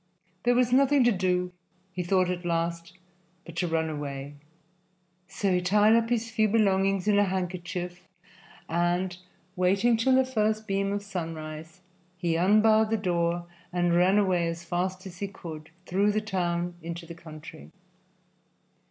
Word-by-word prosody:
There 245 0 +4
was 245 0 +2
nothing 275 +1 +5
to 240 - +4
do, 180 -2 0 0.4
he 185 - -3
thought 185 +1 +2
at 180 0 -4
last, 170 0 -2 0.5
but 170 - -11
to 175 - 0
run 160 -1 0
away. 145 -2 -5 0.9
So 195 0 -1
he 180 - +2
tied 205 +4 +4
up 230 0 +2
his 230 -1 -1
few 220 -1 +2
belongings 195 -2 +2
in 205 -1 +4
a 205 - +4
handkerchief 180 -1 -4 0.7
and, 175 +2 0 0.4
waiting 195 +6 +3
till 255 +3 +3
the 260 0 +4
first 215 -3 0
beam 195 0 0
of 205 0 -2
sunrise, 160 -4 -6 0.4
he 170 -2 0
unbarred 215 +5 +4
the 225 - +1
door 175 -3 0 0.3
and 175 -1 +1
ran 180 +3 +4
away 185 -4 +2
as 165 0 -4
fast 185 +2 -2
as 180 -2 -10
he 200 - -2
could, 160 -5 -9 0.2
through 200 +4 +1
the 215 - +2
town 175 -4 -2
into 170 +1 -6
the 170 - -9
country. 155 - -11
180 Hz, 155 wpm, -27 LUFS, 170-205 Hz, 0.9 s, nothing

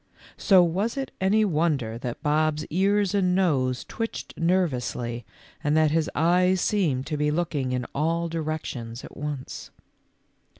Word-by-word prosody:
So 190 -4 +6
was 195 +9 -1
it 270 -1 -3
any 210 +3 +3
wonder 150 - 0
that 125 +2 -5
Bob's 155 0 +1
ears 200 +3 +2
and 185 -3 +2
nose 135 -9 +1
twitched 225 0 -5
ner 180 +2 +2
vously 120 -3 -4 0.4
and 150 +1 +2
that 155 -1 +4
his 160 0 +1
eyes 180 +4 +3
seemed 160 -11 +1
to 150 - -3
be 150 0 +1
looking 150 -5 -1
in 125 -1 -1
all 165 +4 0
directions 155 -8 -4
at - - -11
once 145 -3 -6
155 Hz, 145 wpm, -25 LUFS, 140-180 Hz, 0.4 s, So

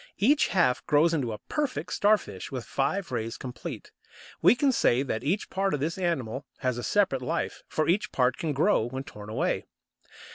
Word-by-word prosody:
Each 275 +9 +4
half 125 -10 +2
grows 155 +3 +4
into 135 -8 0
a 105 - -4
perfect 295 -4 -2
Starfish 205 - +1
with 130 -3 -4
five 170 +5 -1
rays 115 -1 -3
complete. 125 -2 -7 0.5
We - - +6
can 270 +2 +3
say 130 - +3
that 115 -5 -3
each 180 +9 -1
part 195 -3 +1
of - - -4
this 165 +6 -2
animal 140 -8 -2
has 125 -3 0
a - - -5
separate 190 - +2
life, 165 +7 -2
for 155 - -1
each 190 +4 +1
part 125 -1 +2
can 160 - -2
grow 145 - +2
when 130 +2 -5
torn 105 -5 -10
away. 110 - -1
145 Hz, 185 wpm, -28 LUFS, 125-195 Hz, 0.5 s, We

